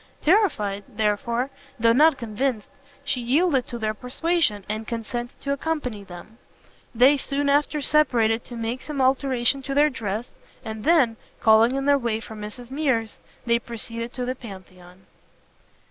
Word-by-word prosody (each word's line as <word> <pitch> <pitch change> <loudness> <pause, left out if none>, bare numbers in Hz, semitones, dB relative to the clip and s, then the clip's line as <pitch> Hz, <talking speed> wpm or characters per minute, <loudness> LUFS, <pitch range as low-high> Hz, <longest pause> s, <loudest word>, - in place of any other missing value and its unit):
Terrified, 215 - +2
therefore, 235 +5 -1 0.3
though 230 0 +4
not 300 +3 +5
convinced, 230 -1 -2 0.4
she 265 -3 -1
yielded 270 +2 +2
to 240 - -5
their 215 -1 -1
persuasions, 250 - 0
and 215 +1 -4
consented 240 +1 -5
to 280 - -1
accompany 280 -8 -3
them. 195 +5 -12 0.6
They 260 +5 +6
soon 280 +1 -1
after 295 +1 +2
separated 235 -7 +2
to 240 - -9
make 230 +2 -3
some 300 -2 -6
alteration 265 0 +2
in 275 0 -4
their 295 +1 +4
dress, 220 -1 -4 0.3
and 220 -1 -6
then, 275 -9 +4 0.2
calling 225 +3 +5
in 275 0 -2
their 285 0 +4
way 235 -3 -1
for 225 - -10
Mrs 215 +4 -9
Mears, 265 -7 -1 0.3
they 235 0 +3
proceeded 230 0 -4
to 250 -1 -3
the 255 - -1
Pantheon. 185 -5 -13
240 Hz, 150 wpm, -24 LUFS, 220-275 Hz, 0.6 s, They